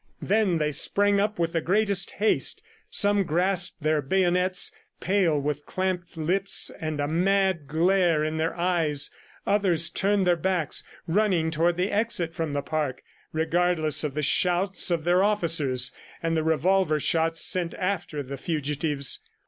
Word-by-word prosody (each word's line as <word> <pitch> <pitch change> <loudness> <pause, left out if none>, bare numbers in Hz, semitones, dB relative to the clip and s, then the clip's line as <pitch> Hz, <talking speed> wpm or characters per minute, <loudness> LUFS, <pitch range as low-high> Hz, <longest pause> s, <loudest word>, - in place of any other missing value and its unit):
Then 200 -4 +1
they 150 -1 0
sprang 200 +7 +2
up 210 +1 -1
with 170 0 -1
the 165 - 0
greatest 200 +2 +2
haste. 215 +2 +1 0.3
Some 205 -1 +2
grasped 175 -1 0
their 155 -1 +1
bayonets, 180 +4 +1 0.3
pale, 180 -6 +1
with 145 +1 -4
clamped 185 -2 -3
lips 185 +5 +1
and 155 -2 -4
a 145 - 0
mad 185 -1 +1
glare 170 0 +2
in 155 +1 -2
their 160 +1 -1
eyes; 170 -5 0 0.3
others 180 -5 +1
turned 200 0 +1
their 175 -1 +3
backs, 170 -2 -1 0.2
running 175 -3 +1
toward 170 +2 +1
the 185 +3 -1
exit 205 -6 -1
from 160 -2 -3
the 140 -1 -2
park, 150 -3 -3 0.3
regardless 160 -1 +1
of 145 -3 -3
the 150 - -2
shouts 180 +5 +2
of 170 -3 -1
their 175 +3 +3
officers 165 -11 0 0.3
and 165 0 0
the 160 - +1
revolver 160 +1 +1
shots 165 +2 +1
sent 175 -2 +1
after 180 -6 -3
the 140 +1 -7
fugitives. 145 -2 -1
170 Hz, 150 wpm, -25 LUFS, 155-190 Hz, 0.3 s, their